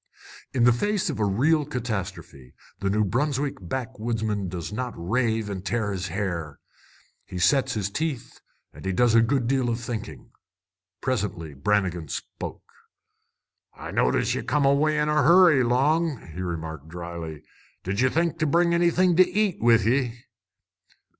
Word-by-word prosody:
In 125 - +1
the 125 0 +6
face 205 - 0
of 135 - -6
real 130 +10 +2
catastrophe 110 - -5 0.2
the 100 - -1
New 105 +2 +2
Brunswick 135 +5 -1
backwoodsman 110 -1 -3
does 85 +2 -5
not 125 +2 -4
rave 110 +4 0
and 95 -2 -5
tear 105 -1 -1
his 95 -1 -3
hair. 85 -6 -3 0.7
He 90 - -8
sets 135 +10 +2
his 100 -2 -2
teeth 150 -1 -4 0.3
and - - -12
he 95 0 -1
does 120 +3 +3
a 115 - +6
good 125 +2 +1
deal 130 0 +1
of 115 0 -1
thinking. 120 -2 -6 0.7
Presently 100 - -2
Brannigan 90 +2 0
spoke. - - -6 1.1
"I - - -8
noticed - - +1
ye - - -2
come 150 -2 +1
away 150 +2 +3
in 150 0 +1
a 150 0 +3
hurry, 170 -2 +6
Long!" 140 - +1
he 90 - -5
remarked 80 -4 -5
drily. 85 -3 -7 0.4
"Did 100 +4 -1
ye 130 - +4
think 165 +2 0
to 155 - +1
bring 170 +3 +3
anything 175 +1 +3
to 185 - +6
eat 205 -1 0
with 115 -2 +4
ye?" 120 0 0
115 Hz, 155 wpm, -25 LUFS, 95-145 Hz, 1.1 s, the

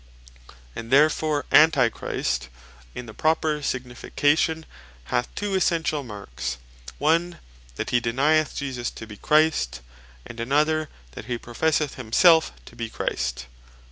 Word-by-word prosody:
And 115 - -7
therefore 150 +1 +3
Antichrist 115 - +2 0.5
in 125 - -6
the 110 - -10
proper 155 0 0
signification 145 +5 0 0.4
hath 120 - -1
two 205 -1 -3
essentiall 165 -5 0
marks; 100 - -6 0.4
One, 170 +4 +1 0.4
that - - -4
he 125 - +3
denyeth 145 +7 +1
Jesus 130 -4 -3
to 110 - -10
be 105 -2 -11
Christ; 150 - +2 0.4
and 115 - -10
another 150 +5 +1 0.2
that - - -9
he 120 0 -3
professeth 145 +5 -1
himselfe 160 +8 +4
to - - -14
bee 115 -1 -5
Christ. 65 - -3
140 Hz, 120 wpm, -24 LUFS, 115-155 Hz, 0.5 s, himselfe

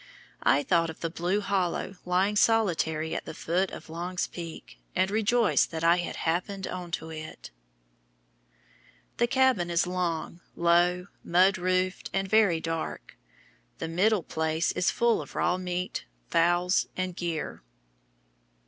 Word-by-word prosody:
I 145 - +3
thought 165 -1 +2
of 160 - -9
the 165 - -2
blue 180 +5 0
hollow 195 -1 -1
lying 185 +3 +2
solitary 165 -8 +2
at - - -3
the - - -7
foot 180 +3 0
of - - -9
Long's 175 +3 -3
Peak, 170 -2 -9 0.2
and 190 +1 +2
rejoiced 220 +2 +3
that 165 0 -5
I 170 +1 +5
had 175 - -3
"happened 185 +4 -2
into 170 -2 -5
it." 155 - -8 1.7
The 240 - +3
cabin 260 -9 +2
is 170 0 +2
long, 180 -2 -2 0.2
low, 175 +1 +3 0.2
mud 185 +2 +4
roofed, 185 +1 0
and 195 0 0
very 200 -5 +4
dark. 165 0 -4 0.6
The - - -4
middle 190 +4 +2
place 160 +2 0
is 180 - +1
full 235 -1 +2
of - - -11
raw 180 - +1
meat, 180 0 -3 0.3
fowls, 175 +2 +3
and 185 -1 -2
gear. 170 -4 -4
180 Hz, 140 wpm, -28 LUFS, 165-190 Hz, 1.7 s, I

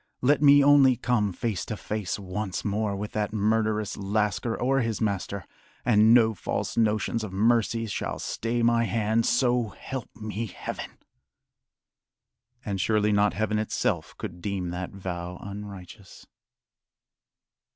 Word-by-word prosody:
Let 145 +4 +4
me 145 -1 +7
only 140 -2 +6
come 115 -4 0
face 105 +1 -2
to 110 - -5
face 105 -4 -3
once 100 0 -4
more 105 0 0
with 105 +2 -5
that 105 -1 -2
murderous 110 -1 0
lascar 105 +2 -1
or 135 +2 +2
his 115 -3 -2
master, 100 -3 -2 0.4
and 110 -2 +5
no 115 -2 +6
false 95 - -3
notions 110 0 +1
of 105 - -5
mercy 115 +2 +2
shall 105 - -3
stay 115 +1 -2
my 115 0 +3
hand 115 0 +1
so 120 -3 +2
help 130 +5 -7
me 110 0 -4
Heaven!" - - -7 1.7
And 100 -3 -2
surely 105 0 +2
not 105 -3 +2
Heaven 110 +1 0
itself 110 - -1
could 85 0 -7
deem 95 -2 -3
that 90 +1 -4
vow 90 -2 -6
unrighteous. 100 -1 -10
105 Hz, 135 wpm, -26 LUFS, 100-115 Hz, 1.7 s, me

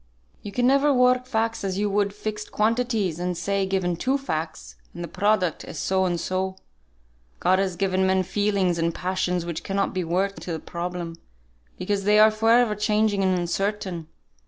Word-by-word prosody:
"You 205 - -7
can 245 +4 0
never 275 +3 +4
work 250 -1 +3
facts 225 -2 -1
as 190 -1 -2
you 205 +1 +1
would 200 0 +1
fixed 210 +1 -5
quantities, 220 -6 0
and 180 0 -2
say, 195 +2 0
given 185 -2 0
two 260 +10 0
facts, 155 - -5 0.2
and 175 - -5
the - - -4
product 190 -1 +1
is - - -8
so 190 0 +1
and 175 -2 0
so. 185 +2 -2 0.8
God 185 - +3
has 190 -2 0
given 190 +1 +1
men 190 0 +2
feelings 195 -3 0
and 165 0 0
passions 180 -1 -1
which 170 -2 -4
cannot 195 0 -1
be 185 -1 -1
worked 190 +4 -1
into 175 - -5
the 160 - -3
problem, 170 -1 -5 0.6
because 200 +1 -1
they 210 +1 +5
are 215 +1 +7
for 220 +1 0
ever 235 -1 +5
changing 210 -1 +1
and 185 -1 +2
uncertain. 180 -1 -2
195 Hz, 180 wpm, -24 LUFS, 180-215 Hz, 0.8 s, are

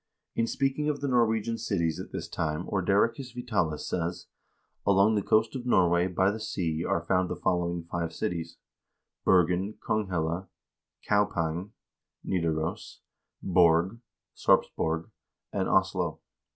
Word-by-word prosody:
In 115 - 0
speaking 135 +4 0
of 145 - -1
the 140 - -2
Norwegian 115 -2 +1
cities 85 -8 -1
at - - -7
this - - -5
time 80 +1 -2
Ordericus 105 +6 +1
Vitalis 105 -11 -1
says: 85 0 -2 0.3
" - - -26
Along 100 +2 +5
the 105 - +2
coast 110 +5 +2
of 125 -1 -5
Norway, 85 -5 +4
by 95 +2 +2
the 110 - -5
sea, 85 -6 -2
are 85 -1 -1
found 90 0 +1
the - - -2
following 85 -1 -1
five 85 -1 -3
cities: 85 0 -4 0.7
Bergen, 90 +3 +3
Konghelle, 90 -3 -1 0.6
Kaupang 95 -2 0 0.5
(Nidaros), 80 -3 -2 0.4
Borg 90 +3 +3 0.4
(Sarpsborg), 80 +1 +1 0.4
and 95 -2 0
Oslo. 95 -3 +1
95 Hz, 125 wpm, -28 LUFS, 85-110 Hz, 0.7 s, Along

